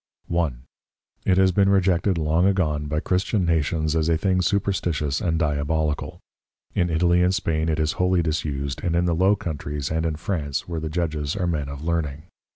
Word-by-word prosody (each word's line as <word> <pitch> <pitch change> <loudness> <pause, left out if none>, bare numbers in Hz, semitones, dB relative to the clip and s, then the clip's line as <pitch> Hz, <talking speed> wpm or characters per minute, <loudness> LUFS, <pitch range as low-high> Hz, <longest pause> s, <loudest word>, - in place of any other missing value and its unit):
1. 80 -8 -1 0.6
It 95 - +4
has 95 -1 +5
been 100 +2 +3
rejected 95 -1 +2
long 80 +3 +2
agone, 75 -6 -1
by 75 +1 0
Christian 95 +3 0
Nations 80 -1 0
as 80 0 +1
a 80 - +3
thing 95 +1 +1
Superstitious 85 -7 0
and 80 -2 0
Diabolical: 75 0 -1 0.5
In 90 -1 +1
Italy 85 +2 +3
and 90 +1 +3
Spain 80 -2 0
it 80 - 0
is 80 0 +1
wholly 90 -1 +1
disused; 70 -3 -2
and 85 -1 0
in 85 +1 +2
the 85 - +1
Low 95 +5 +3
Countries, 75 -5 -4
and 80 0 0
in 80 -2 -1
France, 75 -4 -3
where 85 -2 -3
the 80 0 -4
Judges 75 -2 -2
are 95 -3 -1
Men 75 -5 -1
of 70 +1 -7
Learning. 80 -3 -2
80 Hz, 185 wpm, -24 LUFS, 75-90 Hz, 0.6 s, has